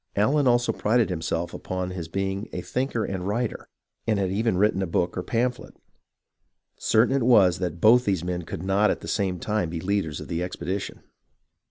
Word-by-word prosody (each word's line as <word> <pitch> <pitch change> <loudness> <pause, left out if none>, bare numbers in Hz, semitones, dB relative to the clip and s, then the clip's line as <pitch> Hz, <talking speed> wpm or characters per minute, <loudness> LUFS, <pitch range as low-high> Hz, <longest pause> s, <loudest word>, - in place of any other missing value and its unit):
Allen 135 +7 +3
also 120 -1 +3
prided 110 -1 +1
himself 85 0 -2
upon 95 0 -4
his 90 -3 -5
being 95 +4 -3
a 90 - -4
thinker 125 0 -2
and 95 -1 -4
writer, 115 +3 -2 0.4
and 110 -2 +2
had 95 -2 0
even 110 -1 +1
written 100 -1 +2
a 95 - -1
book 85 +1 0
or 90 - -2
pamphlet. 120 +5 -2 1.0
Certain 115 +5 +2
it 135 - +1
was 100 -7 +5
that 90 -3 -3
both 120 +5 +6
these 95 -7 0
men 90 0 -2
could 80 0 -7
not 95 +2 +3
at - - -1
the - - -8
same 95 -4 0
time 105 -2 -1
be 85 0 -4
leaders 90 -4 -1
of - - -8
the 85 -1 -2
expedition. 95 +2 -4
95 Hz, 190 wpm, -25 LUFS, 90-115 Hz, 1.0 s, both